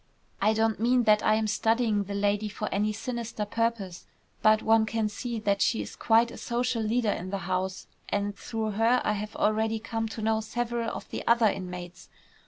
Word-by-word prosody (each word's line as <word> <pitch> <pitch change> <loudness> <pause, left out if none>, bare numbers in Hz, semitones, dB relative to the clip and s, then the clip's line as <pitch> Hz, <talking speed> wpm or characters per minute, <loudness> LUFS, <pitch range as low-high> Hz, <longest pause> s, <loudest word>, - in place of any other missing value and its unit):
I 215 +2 +4
don't 220 -1 +1
mean 245 +2 +3
that 210 -1 +4
I 215 - +4
am 220 0 0
studying 220 -1 +1
the 200 +1 -5
lady 205 +1 0
for 210 +1 -4
any 210 +2 +1
sinister 230 -1 -4
purpose, 225 -4 -2 0.3
but 215 0 +4
one 220 0 +4
can 220 0 0
see 235 +2 -4
that 200 -2 +1
she - - +2
is 100 - -9
quite 230 +1 +3
a - - -9
social 240 0 -1
leader 220 0 +1
in 180 0 -4
the 200 - -2
house, 185 0 -2 0.2
and 205 0 -1
through 220 +1 -3
her 225 +4 +3
I 210 - +2
have 210 +1 -5
already 220 +1 +1
come 225 0 -3
to 220 0 -6
know 220 0 +1
several 235 +1 -2
of - - -7
the - - -4
other 235 -1 +5
inmates. 180 -3 -3
220 Hz, 195 wpm, -28 LUFS, 205-230 Hz, 0.3 s, other